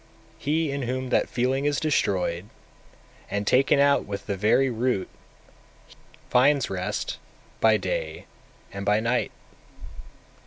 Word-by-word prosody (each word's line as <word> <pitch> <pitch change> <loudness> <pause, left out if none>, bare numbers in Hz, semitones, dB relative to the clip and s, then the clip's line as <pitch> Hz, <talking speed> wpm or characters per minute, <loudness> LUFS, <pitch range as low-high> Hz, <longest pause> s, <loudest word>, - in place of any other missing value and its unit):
250. 145 - -2
He 160 -1 +1
in 140 0 -3
whom 130 +1 -3
that - - +1
feeling 130 +3 0
is 145 -1 +1
destroyed, 95 - 0 0.8
and 100 0 -2
taken 135 +6 +4
out 140 0 +4
with 100 -1 -6
the 100 - -2
very 110 +7 +3
root, 120 -4 -1 1.2
finds 135 0 +3
rest 95 -1 -3 0.4
by 110 -1 +5
day 80 -6 -4 0.5
and 100 0 -5
by 105 +1 +2
night. 115 +2 0
125 Hz, 125 wpm, -25 LUFS, 100-135 Hz, 1.2 s, by